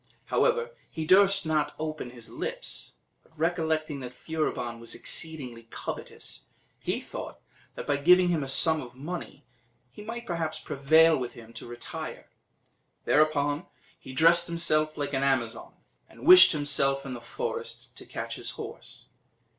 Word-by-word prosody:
However, 475 0 +2 0.2
he 160 -1 -5
durst 195 +2 +5
not 155 -2 +1
then - - -17
open 155 -4 -4
his 120 -2 -10
lips; - - -4 0.3
but 160 - -29
recollecting 160 -2 -1
that 125 -1 -8
Furibon 125 -8 -3
was 115 0 -6
exceedingly 125 -8 -3
covetous, - - -7 0.3
he - - -2
thought - - -8 0.4
that, - - -6
by 145 - +1
giving 180 +5 +5
him 165 -3 +1
a 135 - -4
sum 155 +3 +6
of 125 -1 -11
money, 160 +1 -7 0.5
he 170 - -11
might 235 +2 -6
perhaps 165 -4 -3
prevail 160 +4 +4
with 125 -4 -4
him 115 0 -13
to 115 - -9
retire. 120 0 -8 0.7
Thereupon, 150 0 +2 0.3
he - - -10
dressed 165 +5 +5
himself 155 -2 0
like 145 -1 -3
an 135 - 0
Amazon, 130 -4 -1 0.3
and - - -13
wished 365 +1 +10
himself 140 -2 +2
in 135 - -5
the 120 - -7
forest, 115 - -5
to - - -11
catch - - -5
his - - -4
horse. - - -8
155 Hz, 155 wpm, -28 LUFS, 135-170 Hz, 0.7 s, wished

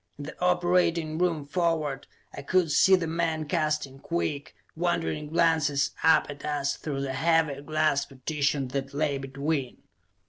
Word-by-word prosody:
In 145 - -7
the 155 - -9
operating 175 -3 +1
room 165 -5 0
forward, 155 -3 -1 0.3
I - - -7
could 170 +2 +1
see 190 +5 +6
the 180 -3 -1
men 160 -1 -1
casting 150 -4 -1
quick, 155 -4 -3 0.2
wondering 155 - -1
glances 160 -4 +2
up 160 0 +5
at 145 -1 -9
us 145 -2 -1
through 140 -3 -4
the 135 -1 -3
heavy 160 -2 +1
glass 155 -1 +1
partition 140 0 -2
that 135 +1 -4
lay 145 -2 0
between. 135 0 -3
155 Hz, 145 wpm, -27 LUFS, 140-165 Hz, 0.3 s, see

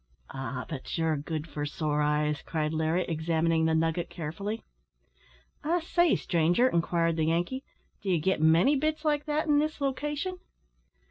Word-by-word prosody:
"Ah! 130 -1 -4
but 150 0 -5
ye're 160 -1 +1
good 155 +2 -4
for 150 -1 -5
sore 150 0 -1
eyes," 150 0 +1
cried 155 -1 -2
Larry, 160 +3 +1
examining 160 0 +1
the 160 0 +2
nugget 165 +1 0
carefully. 195 +7 -5 1.0
"I 335 +4 +2
say, 345 0 +3
stranger," 175 +8 +2
inquired 170 -4 +1
the 160 - +2
Yankee, 175 +12 0 0.4
"d'ye 190 -4 +1
git 165 +1 0
many 165 - +5
bits 310 +2 -1
like 295 -1 +1
that 305 +1 0
in 295 -2 +4
this 310 +1 -1
location?" 295 +6 -2
165 Hz, 150 wpm, -29 LUFS, -, 1.0 s, many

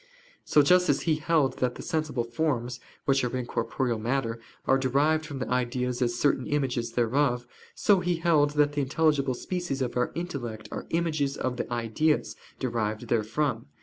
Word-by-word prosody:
So 150 - +4
just 180 +5 +4
as - - +3
he 160 -3 +1
held 155 -4 +1
that 125 -1 0
the - - -8
sensible 155 -6 -1
forms, 125 -1 -1 0.3
which 135 -1 +3
are 125 +1 -1
in 125 - -3
corporeal 115 0 -1
matter, 115 0 -1 0.3
are 135 0 +4
derived 150 +4 +2
from 145 -3 -6
the 130 - -3
ideas 125 0 -1
as 120 -1 +1
certain 135 -2 +1
images 125 -5 -1
thereof: 125 +1 +1 0.3
so 200 -2 +4
he 180 -1 0
held 165 -3 +3
that 145 0 +4
the 145 - 0
intelligible 140 -1 +1
species 175 -2 -3
of 130 -2 -2
our 125 - +1
intellect 130 -11 -5
are - - -6
images 155 -5 0
of 125 -1 -2
the - - -4
ideas, 120 +7 0 0.2
derived 115 -2 -2
therefrom. 115 +2 0
135 Hz, 175 wpm, -27 LUFS, 120-150 Hz, 0.3 s, So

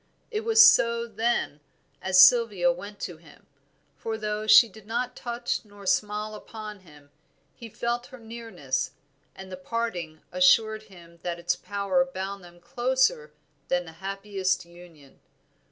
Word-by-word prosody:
It 430 -1 -2
was 450 0 +8
so 235 - +3
then, 230 -10 -1 0.4
as 185 -1 +3
Sylvia 200 -4 +6
went 200 +4 -8
to 175 - -5
him; 160 -1 -19 0.5
for 225 -1 -4
though 215 0 -3
she 235 - +8
did 215 0 -16
not 240 +2 -2
touch 240 0 -3
nor 205 -2 -15
smile 210 +3 0
upon 215 -1 -9
him, 150 -5 -19 0.4
he 230 - -11
felt 240 +3 -3
her 260 - -12
nearness; 220 - -4 0.4
and 190 0 -11
the 185 - -6
parting 185 -7 -4
assured 225 -6 +4
him 170 -3 -16
that 175 -1 -3
its 175 +1 -1
power 200 +9 0
bound 195 -7 -6
them 175 0 -15
closer 240 -7 0 0.4
than 180 0 0
the 165 - -10
happiest 195 -2 -2
union. 170 -5 -17
205 Hz, 145 wpm, -26 LUFS, 175-230 Hz, 0.5 s, was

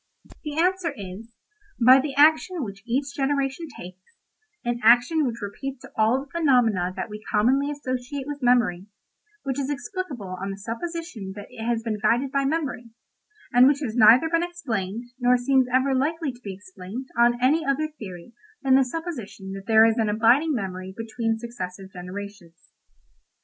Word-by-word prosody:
"The 300 -1 -5
answer 360 0 +1
is: 195 +3 -8 0.5
'By 255 +2 +8
the 275 0 -3
action 315 +3 +4
which 200 -3 -7
each 275 +3 -1
generation 275 +3 -1
takes—an 240 - -9
action 245 +7 +4
which 235 -2 -5
repeats 265 +6 -6
all 225 +4 +2
the 280 - -28
phenomena 245 - +2
that - - -4
we 210 0 -9
commonly 260 +7 +2
associate 265 -1 -4
with 290 0 -6
memory—which 245 - -2
is 275 0 -2
explicable 280 - -5
on 195 - -3
the 195 - -5
supposition 230 - -6
that 205 -1 -9
it 225 - -8
has 230 -1 -1
been 220 -2 -3
guided 245 +5 +1
by 275 0 +1
memory—and 270 - -1
which 285 +1 +2
has 230 -6 -3
neither 240 +6 +7
been 335 +1 +1
explained, 235 - -3 0.2
nor 250 0 +4
seems 260 +1 +2
ever 260 +2 +2
likely 300 +3 0
to 245 0 -18
be 200 -4 -6
explained 190 +5 -8
on 240 0 +3
any 290 +6 +3
other 290 +1 0
theory 210 - -10 0.3
than 265 -1 +3
the 265 0 +6
supposition 250 - -6
that 195 0 -8
there 220 0 +7
is 225 +1 +2
an 220 -2 +1
abiding 240 +9 +3
memory 190 -3 -5
between 225 0 -2
successive 195 -5 -7
generations. 180 -1 -9
245 Hz, 160 wpm, -24 LUFS, 210-285 Hz, 0.5 s, By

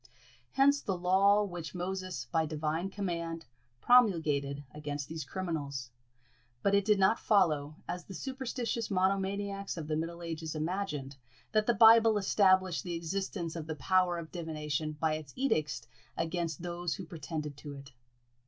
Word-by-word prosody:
Hence 280 +1 +4
the 190 -2 -2
law 195 +3 +4
which 175 -4 -6
Moses, 185 +1 -3
by 160 -2 +2
Divine 155 +4 -2
command, 170 -4 -3 0.4
promulgated 155 - +3
against 145 -1 -5
these 160 -1 -5
criminals; 145 -9 -4 0.7
but 200 - +3
it 200 -1 +4
did 210 -1 +4
not 195 +4 +4
follow, 155 -8 +2
as 180 - -4
the 195 - -9
superstitious 250 - -3
monomaniacs 195 +1 0
of 155 -2 -5
the 155 - 0
middle 170 +2 -4
ages 160 -1 -4
imagined, 155 -5 -3 0.3
that 215 0 +2
the 235 - +3
Bible 225 -1 +7
established 190 -5 +3
the 175 -1 -3
existence 170 0 -3
of 160 -2 -5
the 160 - -3
power 180 +4 +2
of 165 -2 -7
divination 155 -2 -3
by 160 -1 +2
its 155 -3 -6
edicts 155 - 0 0.3
against 165 -1 -2
those 175 -1 -2
who 190 - -7
pretended 155 -3 -5
to 145 -1 -8
it. 140 0 -11
175 Hz, 150 wpm, -31 LUFS, 155-195 Hz, 0.7 s, Bible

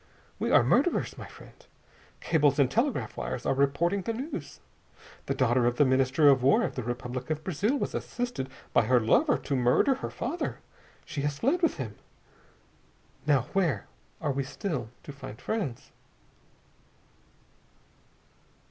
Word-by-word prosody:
We - - 0
are - - +6
murderers, 355 - +2
my - - -9
friend. - - -14 0.7
Cables 150 -4 +2
and 140 -3 +3
telegraph 230 - 0
wires - - -4
are - - +2
reporting 140 +8 +1
the 230 +4 -2
news. 265 +8 -6 0.7
The - - 0
daughter 125 -2 +3
of 120 - +1
the 145 - +4
Minister 130 +3 +3
of 135 -2 +6
War 135 +2 +4
of - - -2
the 125 - -3
Republic 125 +2 -5
of 155 0 -2
Brazil 205 - 0
was - - -3
assisted 240 - -3 0.2
by - - +4
her 125 -1 +5
lover 250 - +3
to 140 - -3
murder 125 - +3
her 265 - -5
father. 300 +9 -3 0.5
She 155 -4 -4
has 145 0 -1
fled 280 - +1
with 330 - +2
him. 115 -7 -6 1.3
Now 145 -3 +4
where 165 - +1 0.3
are 145 - -1
we 135 0 -1
still 135 - -4
to - - -8
find 130 -6 -10
friends?" 185 - -4
140 Hz, 150 wpm, -28 LUFS, 130-200 Hz, 1.3 s, are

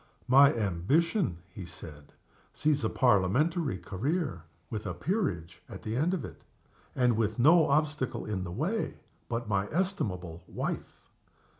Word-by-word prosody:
"My 135 +2 +7
ambition," 115 - +1 0.2
he 100 - -7
said, 80 -4 -11 0.4
"sees 150 -3 +1
a 110 - +2
Parliamentary 130 - +2
career, 120 - -2 0.3
with 105 -1 -4
a 90 - -3
Peerage 90 - -2
at 95 -2 -9
the 110 +1 -3
end 165 +8 +2
of 170 - -4
it - - -11 0.5
and 125 -3 +3
with 110 -1 0
no 155 +6 +6
obstacle 150 -2 0
in 100 -3 -2
the 85 - -5
way 165 - -2 0.3
but 120 -1 -2
my 100 -2 0
estimable 100 - -2
wife." - - -4
120 Hz, 140 wpm, -30 LUFS, 95-155 Hz, 0.5 s, My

